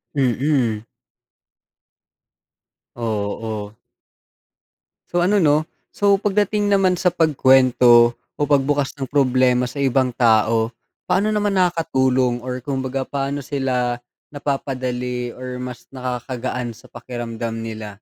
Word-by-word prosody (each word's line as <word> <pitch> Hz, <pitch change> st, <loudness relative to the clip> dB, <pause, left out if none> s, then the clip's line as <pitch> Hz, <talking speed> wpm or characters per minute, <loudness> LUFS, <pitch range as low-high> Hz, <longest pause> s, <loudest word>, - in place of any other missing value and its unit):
Mm. 125 Hz, -4 st, +1 dB, 2.1 s
Oo. 110 Hz, -2 st, -3 dB, 1.4 s
So 175 Hz, 0 st, +1 dB
ano 200 Hz, +1 st, +3 dB
'no? 155 Hz, 0 st, +3 dB, 0.3 s
so 200 Hz, -1 st, +3 dB
pagdating 205 Hz, 0 st, +1 dB
naman 190 Hz, -2 st, +3 dB
sa 180 Hz, +1 st, +2 dB
pagkwento 130 Hz, -6 st, +5 dB
o -, -, -43 dB
pagbukas 145 Hz, -1 st, +1 dB
ng 135 Hz, -3 st, -5 dB
problema 130 Hz, -2 st, +3 dB
sa 140 Hz, +3 st, -5 dB
ibang 130 Hz, -1 st, +1 dB
tao, 115 Hz, -1 st, +3 dB, 0.4 s
paano 200 Hz, +4 st, +2 dB
naman 205 Hz, -1 st, +1 dB
nakakatulong 130 Hz, -8 st, +1 dB
or 125 Hz, 0 st, -4 dB
kumbaga 135 Hz, -1 st, -2 dB
paano 140 Hz, +1 st, -3 dB
sila 125 Hz, -3 st, -1 dB, 0.3 s
napapadali 125 Hz, -4 st, -3 dB
or 125 Hz, 0 st, -6 dB
mas 125 Hz, -1 st, -7 dB
nakakagaan 125 Hz, -1 st, -4 dB
sa 110 Hz, -, -15 dB
pakiramdam 115 Hz, -1 st, -6 dB
nila? 110 Hz, -2 st, -7 dB
130 Hz, 105 wpm, -21 LUFS, 120-145 Hz, 2.1 s, pagkwento